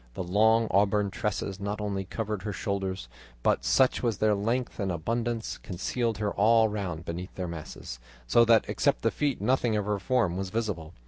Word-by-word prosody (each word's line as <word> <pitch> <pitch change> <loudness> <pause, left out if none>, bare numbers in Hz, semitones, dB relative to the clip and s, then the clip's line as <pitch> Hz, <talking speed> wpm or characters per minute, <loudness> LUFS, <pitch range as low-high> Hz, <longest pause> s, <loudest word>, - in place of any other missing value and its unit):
The - - -3
long 110 +5 +3
auburn 100 0 +2
tresses 100 -1 -3
not 100 +1 -3
only 100 -2 -2
covered 105 0 -3
her 105 +2 -3
shoulders, 95 - -3 0.4
but - - +2
such 130 -1 +3
was 115 -5 0
their 110 -1 +3
length 115 +6 -1
and 100 -2 0
abundance, 115 +7 -2
concealed 115 +4 -2
her 105 -1 -1
all 110 +2 +4
round 90 -6 -4
beneath 90 +3 -6
their 90 -1 -3
masses, 80 -6 -7 0.3
so 65 - +5
that 115 -1 +5
except - - +1
the - - +3
feet 145 -3 -1
nothing 125 -3 +2
of 105 -2 0
her 105 -1 -1
form 100 -5 +1
was 95 -1 -3
visible. 95 -7 -3
105 Hz, 185 wpm, -28 LUFS, 95-115 Hz, 0.4 s, so